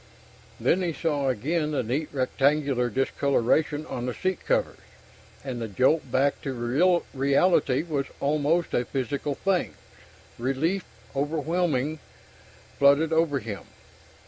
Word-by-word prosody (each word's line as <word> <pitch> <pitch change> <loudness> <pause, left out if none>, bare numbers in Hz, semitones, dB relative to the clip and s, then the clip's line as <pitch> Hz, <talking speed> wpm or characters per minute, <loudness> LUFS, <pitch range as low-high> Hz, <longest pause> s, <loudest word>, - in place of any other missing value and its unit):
Then 185 - +2
he 175 -2 -1
saw 145 -4 0
again 150 +7 0
the 145 -4 -1
neat 135 +7 -2
rectangular 135 -1 +1
discoloration 140 +4 +1
on 125 -4 -4
the 125 - -3
seat 185 -1 -2
covers, - - 0 0.6
and 130 -3 -5
the 115 - -2
jolt 130 +6 +1
back 140 +2 +1
to 135 +8 +1
reality 140 +1 +2
was 145 -5 -2
almost 150 +4 +1
a 120 - +2
physical 140 +2 -3
thing. 195 +2 0 0.6
Relief, 150 +10 0 0.3
overwhelming, 155 0 0 0.8
flooded 140 +3 +5
over 160 -3 +2
him. 110 -6 -6
140 Hz, 120 wpm, -26 LUFS, 130-160 Hz, 0.8 s, flooded